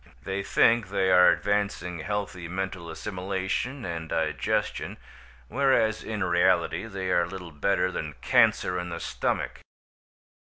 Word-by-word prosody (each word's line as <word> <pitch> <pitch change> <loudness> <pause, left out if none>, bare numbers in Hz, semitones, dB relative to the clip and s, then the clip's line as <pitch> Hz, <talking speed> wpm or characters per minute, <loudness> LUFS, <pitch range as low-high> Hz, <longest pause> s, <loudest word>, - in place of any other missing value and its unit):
They 95 0 -2
think 115 +1 +3
they 95 -1 +1
are 90 0 +7
advancing 100 -4 0
healthy 95 -1 -3
mental 95 -1 -4
assimilation 95 - -3
and 80 -2 -5
digestion, - - -1 0.5
whereas 110 - +2
in 110 -2 -3
reality 85 +5 +2
they 95 -3 -3
are 85 -1 +3
little 90 -1 -8
better 90 +5 +1
than 75 -4 -4
cancer 90 +7 +3
in 90 0 -5
the 85 0 -5
stomach. - - -2
95 Hz, 125 wpm, -27 LUFS, 85-100 Hz, 0.5 s, are